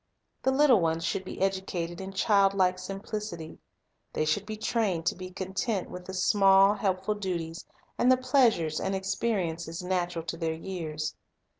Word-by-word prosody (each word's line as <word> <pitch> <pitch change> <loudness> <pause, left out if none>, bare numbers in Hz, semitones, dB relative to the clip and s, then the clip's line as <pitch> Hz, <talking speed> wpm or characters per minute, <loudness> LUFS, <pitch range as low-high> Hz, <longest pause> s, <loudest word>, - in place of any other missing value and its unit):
The 265 - +2
little 265 -6 +5
ones 165 0 0
should 190 - -1
be - - -8
educated 190 -3 -2
in 190 0 -6
childlike 195 -2 +3
sim 195 +1 -6
plicity. 205 -8 -6 0.5
They 155 - 0
should 190 +7 0
be 215 0 -5
trained 210 -7 0
to - - +1
be 185 0 -7
content 190 +2 -3
with 180 0 -8
the 190 - -7
small, 195 +1 +5
helpful 195 0 0
duties 175 -5 -4 0.4
and 250 - +5
the 255 - +5
pleasures 245 - +2
and 195 - -1
experiences 185 -4 -2
natural 175 -2 -1
to 165 0 -4
their 165 -1 -1
years. 160 -4 -4
190 Hz, 160 wpm, -28 LUFS, 170-205 Hz, 0.5 s, little